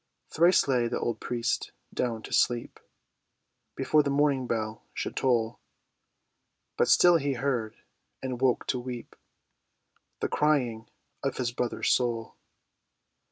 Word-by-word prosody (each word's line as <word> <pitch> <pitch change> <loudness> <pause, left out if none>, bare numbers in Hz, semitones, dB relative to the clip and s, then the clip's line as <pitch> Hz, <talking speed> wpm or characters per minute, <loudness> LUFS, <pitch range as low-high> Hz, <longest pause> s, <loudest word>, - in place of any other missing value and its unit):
Thrice 170 +1 +4
lay 125 -3 +2
the - - -2
old 115 -2 -2
priest 120 0 -2 0.2
down 115 -3 -2
to - - -8
sleep 120 -1 +1 1.0
Before 155 - +3
the 145 - -1
morning 140 -2 +2
bell 110 -1 -3
should - - -4
toll; 120 -3 +1 1.2
But - - +2
still 175 -1 +6
he 140 -2 -1
heard—and 125 0 -5
woke 130 -2 +2
to 125 - -1
weep— 120 -1 -7 1.0
The - - 0
crying 125 -7 +1 0.3
of 135 - -2
his 125 -2 -1
brother's 120 -1 -1
soul. 120 -2 0
125 Hz, 120 wpm, -28 LUFS, 115-140 Hz, 1.2 s, still